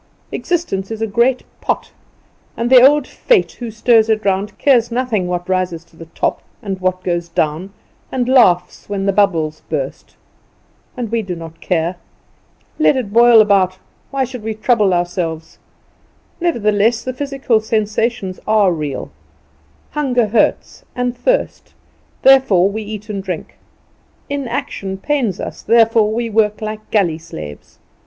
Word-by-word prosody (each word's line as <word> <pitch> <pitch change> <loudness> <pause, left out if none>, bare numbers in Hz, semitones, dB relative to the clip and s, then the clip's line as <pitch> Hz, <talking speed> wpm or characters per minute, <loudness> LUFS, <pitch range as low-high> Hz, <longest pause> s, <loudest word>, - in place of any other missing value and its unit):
Existence 320 - -2
is 225 -1 -5
a 225 - 0
great 235 +5 +1 0.2
pot, - - -2 0.7
and 235 +2 -1
the 255 -2 +9
old 285 +2 +5
Fate 460 - +1
who 240 -2 -5
stirs 225 0 +3
it 215 -1 +1
round 195 +1 -1
cares 245 -5 +3
nothing 235 -6 -1
what 175 0 -3
rises 185 -3 -1
to - - -25
the 165 0 -11
top - - -2 0.2
and 195 -5 -5
what 185 0 -1
goes 175 -1 -2
down, 165 +3 -1 0.4
and 250 -2 -1
laughs 235 -11 +3
when 195 -1 -2
the 195 - +3
bubbles 165 -6 +1
burst. 140 -4 -4 0.8
And 235 -3 -4
we 230 -1 +1
do 185 -4 -5
not 165 -1 -10
care. 170 0 -1 0.8
Let 295 - +4
it 210 -6 -4
boil 235 -1 +7
about. 195 -3 +2 0.3
Why 275 -1 -1
should 250 -2 -6
we 220 0 -4
trouble 215 -3 +2
ourselves? 175 -2 -2 0.8
Nevertheless 230 - +1
the 255 - -4
physical 270 -4 0
sensations 215 -2 -1
are 210 -3 +4
real. 150 -4 -5 0.8
Hunger 250 -7 0
hurts, 215 0 0
and 250 0 -1
thirst, - - -1 0.5
therefore 255 -9 +5
we 220 +2 -4
eat 210 0 -7
and 200 -2 -3
drink: 185 -4 -6 0.8
inaction 235 -8 -4
pains 235 - -1
us, - - -6
therefore 225 -2 +3
we 230 +1 -1
work 215 -1 +1
like 215 0 -6
galley 175 -7 +1
slaves. 75 - -10
215 Hz, 145 wpm, -17 LUFS, 185-240 Hz, 0.8 s, the